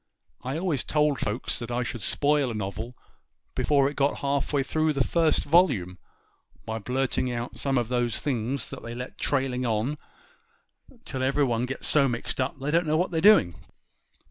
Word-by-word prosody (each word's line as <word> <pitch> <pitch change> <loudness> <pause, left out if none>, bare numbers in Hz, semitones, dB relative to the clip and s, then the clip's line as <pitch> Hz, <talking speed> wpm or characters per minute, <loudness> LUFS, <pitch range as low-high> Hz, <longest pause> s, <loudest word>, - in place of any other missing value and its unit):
I 130 +4 -3
always 165 -7 -1
told 150 -2 +1
folks 105 +4 -2
that 120 -1 -6
I 120 +1 -1
should 120 -1 -5
spoil 145 +1 +1
a 115 - -4
novel 110 +4 -5 0.6
before 140 -2 +2
it 145 - -4
got 140 0 +1
half 140 0 -1
way 140 -2 +1
through 155 +3 0
the 135 -2 +1
first 165 +1 +2
volume, 130 - +2 0.7
by 110 0 -3
blirting 130 +2 -1
out 120 0 -5
some 135 -2 0
of 120 -2 0
those 120 -1 0
things 130 -2 -2
that - - -7
they 115 0 -7
let 125 +1 -7
go - - -10
trailing 130 -3 0
on 120 +5 -1 1.1
till 130 -2 -4
everybody 130 -3 +1
gets 135 - -4
so 140 -3 +4
mixed 120 +2 -2
up 130 +2 -2
they 135 +2 -3
don't 170 +1 +2
know 155 +1 +2
what 180 +3 0
they're 160 -2 0
doing. 200 - +6
135 Hz, 185 wpm, -26 LUFS, 120-145 Hz, 1.1 s, doing